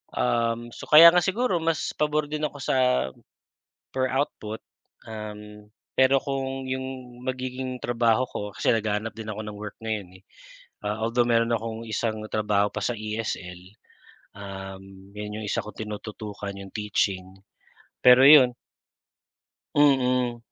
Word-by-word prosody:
Um, 115 0 0
so - - -10
kaya 165 +3 +10
nga 175 - +3
siguro 190 +3 +1
mas 165 -1 -1
pabor 150 0 0
din 150 0 -1
ako 145 - -9
sa - - 0 1.2
per 130 0 0
output. 120 -5 -3 0.4
Um, 105 -1 -9 0.3
pero 130 +1 +5
kung 135 -1 -3
yung 130 -1 -6
magiging 130 0 -4
trabaho 120 0 +2
ko - - -6 0.2
kasi - - +2
naghahanap 110 -1 -1
din 110 -1 -8
ako 110 +1 -6
ng 105 -1 -7
work 105 0 -7
ngayon, 100 -5 -4
eh. - - -31 0.6
Ah, 105 +1 -2
although, 115 +2 +2
meron 115 0 +2
akong 115 0 -4
isang 110 0 -2
trabaho 105 -1 +1
pa 105 - -5
sa 120 +4 0
ESL. 105 -5 -4 0.7
Um, 95 -1 -10
yun 105 +1 -6
yung - - -5
isa - - 0
kong 105 - -7
tinututukan 105 -1 -6
'yong 100 -1 -10
teaching. 95 -3 -2 0.7
Pero 125 +1 +8
yun 135 -3 +8 1.2
Mm, 125 -4 +3
115 Hz, 135 wpm, -25 LUFS, 105-130 Hz, 1.2 s, kaya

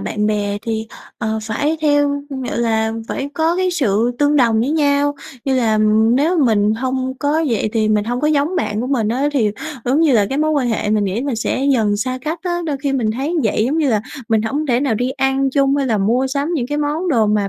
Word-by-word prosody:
bạn 210 0 -2
bè 205 -1 -1
thì, 220 -1 -3 0.3
ờ, 220 -1 -2
phải 290 +9 -1
theo 290 -1 +2 0.3
gọi - - -3
là, 220 -1 +1 0.2
phải 275 - -3
có 325 +3 +1
cái 370 0 +1
sự 235 - +1
tương 290 0 +3
đồng 230 -5 +3
với 250 +5 0
nhau 290 -2 +2 0.3
như 270 - +1
là 220 -3 +2 0.4
nếu 325 +6 +2
mình 215 -6 +3
hông 260 +2 -2
có 305 +3 +1
vậy 225 -3 0
thì 220 -2 +1
mình 210 -1 +2
hông 245 +2 -2
có 300 - +1
giống 305 +4 +1
bạn 215 -9 -1
của 245 - -2
mình 250 -6 0
á 260 +6 0
thì, 230 -7 +2 0.3
giống 265 +5 +2
như 315 -5 +4
là, 210 -4 +3
cái 270 - -2
mối 310 +1 +1
quan 280 -5 +1
hệ 220 -2 -1
mình 210 -1 +2
nghĩ 195 +3 -2
mình 275 -4 -2
sẽ 255 +4 -1
dần 215 -5 +1
xa 255 +4 -2
cách 310 +5 -3
á. 350 -2 -1
Đôi 295 -3 -1
khi 280 -2 0
mình 240 -5 0
thấy 270 +8 -2
như 335 - +1
vậy 215 0 +1
giống 285 +7 0
như 300 -3 +2
là 215 -3 +2 0.3
mình 220 -1 +2
hổng 285 +7 -2
thể 245 -2 +1
nào 270 -5 +1
đi 245 +4 -1
ăn 270 0 0
chung 275 0 +2
hay 280 -1 0
là 225 -4 +1
mua 235 +7 +1
sắm 280 +3 -2
những 255 -7 -1
cái 290 +3 -2
món 300 +5 -1
đồ 230 -9 +3
mà 210 -1 +1
260 Hz, 250 wpm, -18 LUFS, 220-290 Hz, 0.4 s, như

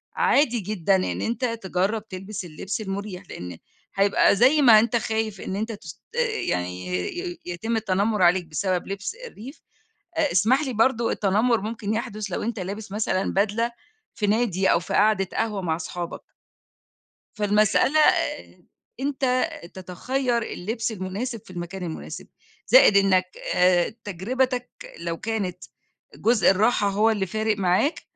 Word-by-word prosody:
عادي 290 - +3
جدًا 195 -1 +1
إن 185 - -1
أنت 235 +3 -1
تجرب 215 -1 -2
تلبس 190 0 -6
اللبس 190 +6 -5
المريح، 200 -1 -5
لأن 90 -1 -7 0.4
هيبقى 200 0 +4
زي 265 +8 +5
ما 230 -6 +8
أنت 235 +1 +1
خايف 220 -3 -2
إن 190 - -4
أنت 220 +3 -2
تست 200 -3 -10 0.5
يعني 90 +1 -2 0.3
ي 355 -2 -5
يتم 200 +7 -3
التنمر 205 0 0
عليك 180 0 +4
بسبب 180 +3 -2
لبس 195 - -4
الريف، 270 - -11 0.6
أ 300 -3 +2
اسمح 225 +9 +3
لي 260 -3 -3
برضه 230 +1 +2
التنمر 215 +4 +2
ممكن 215 0 -3
يحدث 215 -2 -3
لو - - -2
أنت 230 -1 -3
لابس 200 +2 -6
مثلًا 205 -2 -1
بدلة 220 +4 +1 0.4
في 210 - -1
نادي 200 -3 +2
أو 170 - +3
في 180 +3 -6
قعدة 205 -2 +3
قهوة 215 -3 -1
مع 160 -3 0
أصحابك. 175 +1 -5 1.2
فالمسألة 210 +8 +3
آآ - - +1 0.4
أنت 265 0 +1 0.3
تتخَير 235 +7 -2
اللبس 225 +3 -3
المناسب 210 +5 -4
في - - -16
المكان 180 +1 -6
المناسب. 165 -2 -6 0.4
زائد - - +7
إنّك 195 -2 +4 0.3
آآ 180 +3 +3
تجربتك 245 +6 -1 0.3
لو 170 0 -3
كانت 200 -5 -3 0.6
جزء 230 -1 +3
الراحة 205 +1 +3
هو 210 +3 +3
اللي 200 -3 0
فارق 215 +2 -1
معاك 190 - +1
210 Hz, 140 wpm, -24 LUFS, 185-230 Hz, 1.2 s, ما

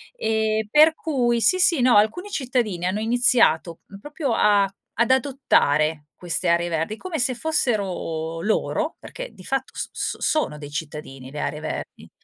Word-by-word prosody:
Ehm, 220 - -1
per 310 +6 +6
cui 245 -6 0
sì, 370 +10 +3
sì, 335 -7 +4
no, 245 -3 +4
alcuni 220 - +1
cittadini 245 - -2
hanno 190 +3 -1
iniziato 230 -8 +3 0.2
proprio 295 -4 -3
a 205 -1 +3 0.3
ad 235 +1 +1
adottare 160 - +1
queste 175 0 0
aree 170 0 +2
verdi 165 +6 -2
come 360 +1 -5
se 255 +1 +1
fossero 195 - -2
loro, 300 - -1
perché - - -8
di 185 - -15
fatto 270 0 -3
s - - -4
s - - -3
sono 305 - 0
dei 145 -1 -9
cittadini 145 -3 -7
le 150 - -7
aree 150 - -3
verdi 155 - -7
220 Hz, 155 wpm, -23 LUFS, 165-265 Hz, 0.3 s, per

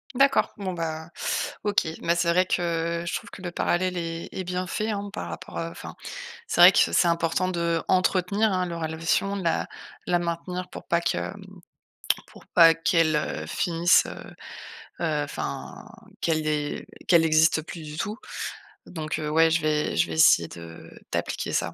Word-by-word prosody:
D'accord. 275 +1 +4
Bon, 190 -3 -3
ben, 160 -1 -4 0.5
OK. 205 -5 +1
Bah, 170 +1 +2
c'est 170 0 +1
vrai 180 +2 +3
que 170 -1 -1
je - - -2
trouve 205 - -6
que 200 - -11
le 175 - -4
parallèle 180 +1 0
est 165 -1 -4
est 190 - -4
bien 180 0 -3
fait, 215 +4 -2
hein. 205 -1 -3
Par 85 - -5
rapport 80 0 -8
à 85 0 -3
enfin 85 - -9 0.5
c'est - - -1
vrai - - +11
que - - +2
c'est 170 - +4
important 170 +2 +1
d'entretenir, 185 +4 +1
hein, 185 -1 0
la 170 -1 -5
relation, 165 +5 0
de - - -5
la 165 - +1 0.4
la 175 - +2
maintenir 175 +1 -4
pour - - -10
pas 170 - +2
que, 170 - 0
hem, 200 0 -5 0.9
pour - - -16
pas 165 -1 +7
qu'elle, 165 -1 +2
heu, 80 - -2
finisse, 170 - +3
heu, - - -9 0.7
heu, 150 -2 0
enfin 145 - -6 0.4
qu'elle 160 -2 0
é 150 -1 -2 0.2
qu'elle 170 -2 +5
existe 160 0 +4
plus 165 +1 -9
du 150 -1 -8
tout. 210 +7 -3 0.7
Donc, 155 -3 -4
heu, 150 -1 -3
ouais, 160 +1 +4
je 165 +1 +1
vais 150 -1 0
je - - +2
vais - - -5
essayer 85 - +5
de 85 -1 -11 0.2
d'appliquer - - -2
ça, - - 0
170 Hz, 180 wpm, -25 LUFS, 160-180 Hz, 0.9 s, vrai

